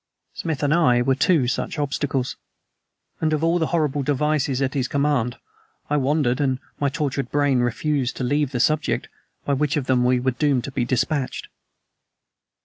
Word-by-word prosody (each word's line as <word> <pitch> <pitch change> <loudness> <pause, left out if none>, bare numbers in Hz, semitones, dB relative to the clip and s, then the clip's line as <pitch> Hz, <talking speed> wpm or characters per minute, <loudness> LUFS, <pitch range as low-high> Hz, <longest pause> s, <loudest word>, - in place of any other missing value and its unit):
Smith 155 -3 -3
and 145 +1 +3
I 125 -8 +4
were 135 +1 +2
two 140 -1 +2
such 125 - -2
obstacles; 140 -2 -1 0.8
and 155 -1 +1
of 155 +1 0
all 165 +2 +2
the 160 - +1
horrible 150 -4 0
devices 145 -1 0
at 135 -1 0
his 130 -3 0
command, 140 -4 0 0.5
I 150 - +3
wondered, 140 -1 +1
and 130 -2 +1 0.2
my 140 - +1
tortured 140 -3 -2
brain 145 -3 +2
refused 130 +2 -1
to - - -3
leave 145 +2 +1
the 125 - -2
subject, 155 +5 +1 0.4
by 140 - +1
which 150 +1 0
of 140 - -1
them 125 -2 +2
were 125 +1 +3
we 130 +1 +1
doomed 130 0 +1
to 140 - -6
be 125 - -1
dispatched? 130 +2 -1
140 Hz, 175 wpm, -23 LUFS, 130-150 Hz, 0.8 s, I